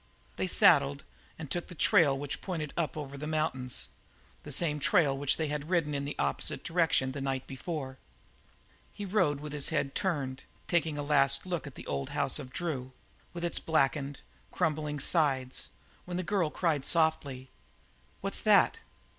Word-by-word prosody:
They - - 0
saddled 70 0 +5 0.3
and 155 -4 -8
took 175 - -1
the 180 - -10
trail 160 -5 +4
which 145 +1 -4
pointed 160 -6 -4
up 160 -2 -1
over 140 -2 -6
the 150 - -4
mountains 155 -5 -2 0.5
the - - -9
same 150 -3 0
trail 145 -3 +3
which 140 0 +1
they 160 - -1
had 150 +1 -3
ridden 165 -5 +1
in 140 0 -2
an 145 - -3
opposite 70 -1 0
direction 165 -6 +2
the 140 +1 -5
night 135 -1 -2
before. 135 -1 -5 0.9
He 205 - -6
rode 180 -8 +2
with 150 -1 -6
his 145 -2 +2
head 140 -3 -1
turned, 145 -9 -2 0.2
taking 165 -3 +1
his 145 0 -3
last 140 -1 +3
look 175 -5 -3
at 140 - -10
the - - -9
old 70 -1 -3
house 140 +2 +1
of 130 -3 -8
Drew, 130 -6 -4 0.4
with 175 0 -4
its 170 - 0
blackened, 140 -2 0 0.3
crumbling 150 -3 -1
sides, 135 -4 0 0.4
when 180 0 -4
the 185 - -1
girl 180 -3 +1
cried 155 -4 0
softly: 140 -5 0 0.7
"What's - - +2
that? - - +5
150 Hz, 170 wpm, -30 LUFS, 135-165 Hz, 0.9 s, saddled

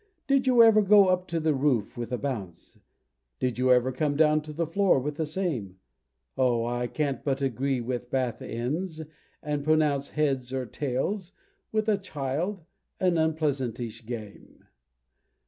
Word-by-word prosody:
Did 270 -1 +2
you 245 -2 +7
ever 220 -1 +6
go 200 -1 +6
up 185 0 +1
to 165 -2 -1
the 160 -1 +1
roof 130 -6 0
with 120 -1 -5
a 125 - 0
bounce? 100 -12 -6 0.6
Did 125 - -2
you 130 0 +3
ever 125 +1 +4
come 145 +3 -1
down 155 0 +4
to 155 0 -9
the 165 +3 -1
floor 190 +3 +3
with 145 +3 -4
the 160 - -1
same? 145 - -3 0.6
Oh! 120 -3 +2
I 120 +1 -1
can't 140 0 -2
but 135 -1 0
agree 135 0 0
with 125 0 -4
bath 130 -3 -1
ends, 155 +8 -3 0.4
and 150 -1 -2
pronounce 150 -2 +2
"Heads 135 -4 -1
or 130 -1 -2
tails," 150 - -3 0.4
with 215 0 0
a 210 -2 +2
child, 165 +2 -3 0.4
an 180 -3 +2
unpleasantish 130 -8 -2
game! 110 -4 -9
145 Hz, 160 wpm, -27 LUFS, 125-165 Hz, 0.6 s, you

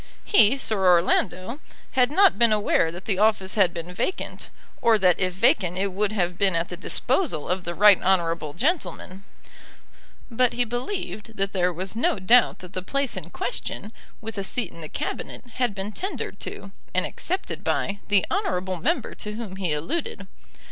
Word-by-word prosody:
He, 265 - +5
Sir 215 -7 +1
Orlando, 185 - +2 0.3
had 250 -2 +3
not 385 -1 +4
been 235 -2 +6
aware 205 -6 +2
that 175 +2 -9
the 195 -3 -1
office 210 -3 +2
had 190 -5 +3
been 170 +1 -7
vacant, 365 - -3 0.3
or 230 -2 +5
that 185 -3 +3
if 185 -1 +1
vacant 180 -1 +2
it 195 +1 0
would 205 +2 0
have 180 -4 -1
been 195 -3 +3
at 165 +1 -1
the 180 - -5
disposal 195 - 0
of 180 0 -2
the 175 0 -3
right 205 0 +6
honourable 165 -5 +1
gentleman; 205 - -2 1.1
but 245 +1 +2
he 245 0 +1
believed 240 - -5
that 195 0 -1
there 180 -2 +2
was 185 +4 -5
no 230 - +1
doubt 230 +6 +4
that 180 - -14
the 185 - -3
place 275 +8 -1
in - - -6
question, 220 - -5 0.3
with 225 -2 -6
a - - -2
seat 215 0 -2
in 170 - -11
the 155 - -7
Cabinet, - - -5
had 245 -5 0
been 195 +1 -4
tendered 380 - -4
to, - - -7 0.2
and - - +3
accepted 375 +1 -4
by, 200 0 -1
the 205 -2 +3
honourable 190 - -1
member 165 - -1
to 210 - -7
whom 210 -4 -6
he 185 -4 -1
alluded. 200 - -3
200 Hz, 180 wpm, -24 LUFS, 180-235 Hz, 1.1 s, been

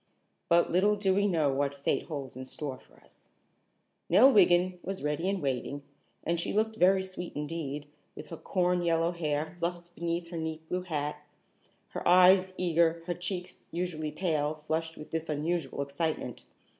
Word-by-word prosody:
But 170 0 +4
little 200 +4 +4
do 200 -2 +1
we 200 +1 +2
know 155 -7 +2
what 140 +1 0
fate 140 - -1
holds 140 -6 -5
in 130 0 -7
store 130 -1 -5
for - - -23
us. - - -20 0.8
Nell 265 +5 +7
Wiggin 180 -2 +4
was 195 -3 -5
ready 150 +5 0
and 195 -5 -2
waiting, 140 +1 -2 0.4
and 170 0 0
she - - -2
looked 220 +1 +1
very 190 0 +4
sweet 185 -2 -6
indeed, 150 -1 -4 0.3
with - - -9
her 165 - -6
corn 180 0 +1
yellow 165 0 +2
hair 155 -1 -2
fluffed 175 0 -3
beneath 170 0 -3
her 170 - -5
neat 160 0 -4
blue 180 +2 -1
hat, 150 -4 -3 0.7
her - - -4
eyes 185 +1 +6
eager, 170 -1 +2
her 175 - -1
cheeks, 180 +1 -5
usually 165 -3 -3
pale, 155 -2 0
flushed 160 +1 -2
with 150 - -10
this 160 0 -3
unusual 150 -2 -1
excitement. 150 +3 -3
170 Hz, 170 wpm, -30 LUFS, 150-180 Hz, 0.8 s, Nell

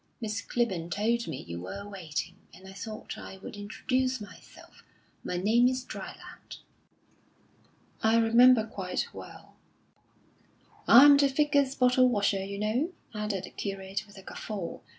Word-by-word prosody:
Miss 215 -3 -3
Clibborn 190 -9 -2
told 230 +5 0
me 145 -5 -5
you 85 0 -7
were 200 - -7
waiting, 175 -2 -5 0.2
and 190 - -14
I 190 - -10
thought 215 +3 -7
I 190 - -9
would 195 - -9
introduce 255 +5 -1
myself. 205 -1 -14 0.4
My 180 - -3
name 225 +7 +4
is 255 0 -2
Dryland." - - -9 1.4
"I 220 +1 +4
remember 230 +1 +6
quite 190 -4 -4
well." - - -12 1.3
"I'm 280 +4 +9
the 280 0 +4
Vicar's 280 -1 +2
bottle 255 -1 +4
washer, 200 -4 +1
you 200 +1 -6
know," 235 - -1 0.2
added 210 -3 -3
the - - -9
curate, 195 0 -5
with 205 0 -16
a 195 - -11
guffaw. 195 -3 -6
215 Hz, 140 wpm, -29 LUFS, 195-250 Hz, 1.4 s, I'm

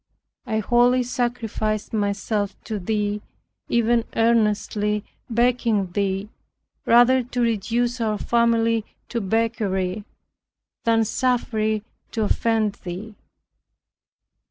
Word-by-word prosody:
I 220 -2 0
wholly 245 +3 +3
sacrificed 235 -4 -2
myself 205 0 -1
to 215 -2 -4
Thee, 210 +1 -1 0.5
even 235 0 +3
earnestly 210 -2 +1 0.3
begging 230 -5 +1
Thee 195 +1 -1 0.6
rather 245 +2 +6
to 245 0 -5
reduce 235 +2 0
our 215 -2 0
family 230 -1 +2 0.3
to 235 - -2
beggary, 205 -2 -1 0.8
than 225 -1 +3
suffer 245 0 0
it 215 -1 0 0.3
to 225 - 0
offend 220 -1 +1
thee. 190 +5 -6
225 Hz, 95 wpm, -23 LUFS, 210-235 Hz, 0.8 s, rather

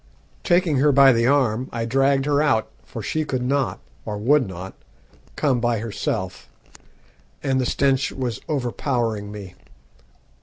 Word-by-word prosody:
Taking 175 -5 +2
her 145 +3 +4
by 135 -1 +7
the 115 0 +2
arm, 130 -3 +1
I 115 -1 -3
dragged 135 +3 +2
her 145 0 +2
out, 145 -8 +1
for - - -8
she 155 - -1
could 130 -4 -2
not, 135 0 0 0.2
or 105 -2 -4
would 130 +4 +3
not, 95 +1 -8 0.6
come 135 -5 +1
by 120 -1 +1
herself, 110 -1 -4 0.9
and 135 -2 +1
the 125 - -1
stench 135 -1 +1
was 125 -5 -4
overpowering 120 -6 -2
me. 100 -3 -9
130 Hz, 145 wpm, -22 LUFS, 115-140 Hz, 0.9 s, by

